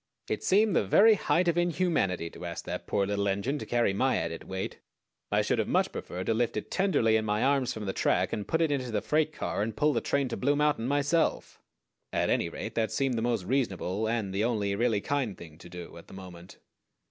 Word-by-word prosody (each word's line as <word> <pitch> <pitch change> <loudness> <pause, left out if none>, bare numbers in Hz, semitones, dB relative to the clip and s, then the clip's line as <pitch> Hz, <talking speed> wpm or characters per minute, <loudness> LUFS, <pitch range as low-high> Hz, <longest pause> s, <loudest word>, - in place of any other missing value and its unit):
It - - -3
seemed 205 0 +3
the - - +3
very 210 - +6
height 180 -3 +1
of 170 0 +2
inhumanity 165 - 0
to - - -11
ask 85 -1 -5
that - - -5
poor 100 - +1
little 100 0 -1
engine 100 +9 -1
to - - -7
carry 120 -5 +2
my 130 +6 +1
added 85 0 -4
weight. 95 0 -5 0.5
I - - +3
should - - 0
have - - 0
much - - +1
preferred 90 +1 -6
to 115 - +1
lift 115 0 0
it 105 - -5
tenderly 145 - +2
in 110 - -1
my 105 0 0
arms 135 -2 +2
from 110 -1 -5
the 95 - -2
track, - - +1
and 105 - -3
put 160 - +1
it 160 -2 +2
into 130 -3 -1
the 105 -3 -2
freight 155 0 +1
car, 125 - -3
and 110 +1 -3
pull 150 0 +3
the - - 0
train 140 -1 0
to - - -3
Blue 140 +3 +2
Mountain 145 -5 +1
myself; 145 +4 0 0.5
at - - 0
any - - +1
rate, - - -6
that 110 -1 0
seemed 135 -2 0
the 115 - -1
most 115 -4 0
reasonable 105 -3 -1
and 110 -4 -1
the 100 +2 0
only 105 -4 0
really 110 0 +1
kind 135 -6 -2
thing 80 -2 -12
to 85 - -12
do 90 -1 -9
at 85 - -13
the - - -12
moment. 90 -1 -11
115 Hz, 235 wpm, -29 LUFS, 100-145 Hz, 0.5 s, very